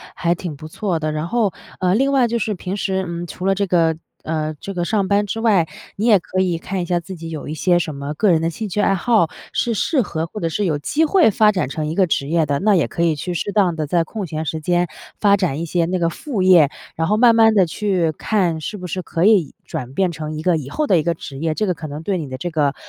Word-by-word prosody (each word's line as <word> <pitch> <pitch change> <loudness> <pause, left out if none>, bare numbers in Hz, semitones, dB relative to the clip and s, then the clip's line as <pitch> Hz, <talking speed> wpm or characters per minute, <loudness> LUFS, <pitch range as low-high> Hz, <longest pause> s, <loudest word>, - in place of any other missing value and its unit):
还 170 -1 +1
挺 175 -3 -6
不 155 +2 -10
错 175 +1 -2
的。 155 0 -2
然 155 +2 -3
后， 220 -2 +1 0.3
呃， 180 -1 +2
另 270 +6 +2
外 265 -3 +3
就 235 0 -1
是 215 -1 -1
平 185 +1 -4
时， 190 -2 -1
嗯， 170 0 -5
除 180 - -7
了 195 - +3
这 200 +1 -1
个 165 -3 +2 0.3
呃， 155 -1 -2
这 195 - -6
个 175 -2 -2
上 200 +1 0
班 200 +1 +2
之 225 - -3
外， 205 -8 +3 0.3
你 210 - -2
也 215 -4 +7
可 185 +2 -2
以 180 -3 0
看 185 +3 -4
一 - - -2
下 175 0 0
自 185 +3 -8
己 165 -1 -8
有 155 -3 -6
一 150 - -4
些 175 +3 +2
什 160 -3 -3
么 140 +1 -5
个 205 +4 +3
人 160 -2 +3
的 165 - +1
兴 210 +6 -5
趣 205 +2 -1
爱 - - +3
好， 200 -3 +2 0.2
是 235 - 0
适 270 - +1
合 165 -6 -3
或 190 +6 -8
者 165 - 0
是 200 +6 -1
有 155 -5 +1
机 305 - +1
会 345 - +4
发 210 +1 +4
展 180 -10 -1
成 155 +2 -3
一 155 - -2
个 190 +2 +3
职 140 -3 -1
业 165 +1 +2
的。 140 0 +1
那 210 0 +3
也 170 - +2
可 170 - -2
以 165 -2 +2
去 180 +4 -4
适 205 - -2
当 195 -5 +2
地 155 -1 -2
在 170 +3 +1
空 200 +5 -5
闲 155 -1 -4
时 160 0 -3
间 175 +2 +1 0.3
发 200 -1 +5
展 165 -6 -1
一 - - -2
些 170 +1 +1
那 180 +2 -1
个 170 -1 +2
副 235 - -4
业， 180 -6 +6 0.3
然 165 0 0
后 210 - +2
慢 230 +1 +5
慢 225 -1 +6
地 195 -4 +4
去 180 -3 0
看 175 -2 0
是 160 - -5
不 180 -2 -7
是 185 +2 -3
可 165 0 -2
以 200 -9 +4
转 125 +1 -6
变 185 +3 +1
成 155 -1 -5
一 - - -4
个 175 0 +2
以 140 -3 -6
后 305 - -1
的 185 - +4
一 - - -1
个 170 +2 +1
职 140 -4 -9
业。 160 +1 0
这 215 - 0
个 185 - +1
可 155 -1 -8
能 150 +2 -7
对 195 +2 -1
你 155 -4 -4
的 130 - -5
这 175 +4 -4
个， 145 -3 +1
175 Hz, 310 characters per minute, -20 LUFS, 160-200 Hz, 0.3 s, 也